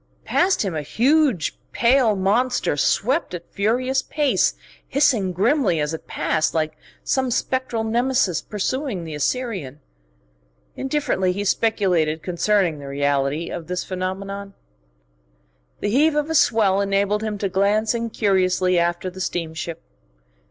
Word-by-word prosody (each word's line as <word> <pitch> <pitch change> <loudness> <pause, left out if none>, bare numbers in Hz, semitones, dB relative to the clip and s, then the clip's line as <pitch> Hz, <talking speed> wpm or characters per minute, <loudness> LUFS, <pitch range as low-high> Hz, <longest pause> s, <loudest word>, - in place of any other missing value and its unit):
Past 370 - +2
him 190 - -2
a 155 - -2
huge 250 - +1
pale 240 -2 +3
monster 225 - +1
swept 250 - +1
at 170 -1 -10
furious 255 +6 +1
pace, 295 -2 +1 0.3
hissing 245 -9 +2
grimly 205 - +2
as 150 +1 -1
it 160 - -7
passed, 155 0 0
like 155 -1 0 0.3
some 260 -1 0
spectral 245 -1 -1
Nemesis 235 -5 +1
pursuing 215 - -3
the 160 -1 -7
Assyrian. 165 - -2 1.0
Indifferently 265 -9 0
he 200 +2 -3
speculated 180 -8 +1
concerning 180 -2 +1
the 140 - -9
reality 140 +2 0
of 165 - -6
this 180 0 -2
phenomenon. 195 +2 -5 1.3
The 205 - -1
heave 295 +6 +3
of 300 +1 0
a - - 0
swell 210 -9 +3
enabled 200 +1 +1
him 215 -1 -3
to 200 - -1
glance 205 +4 +1
incuriously 190 -6 +1
after 175 +2 -1
the 190 +1 -8
steamship. 165 -2 -4
200 Hz, 130 wpm, -22 LUFS, 175-245 Hz, 1.3 s, pale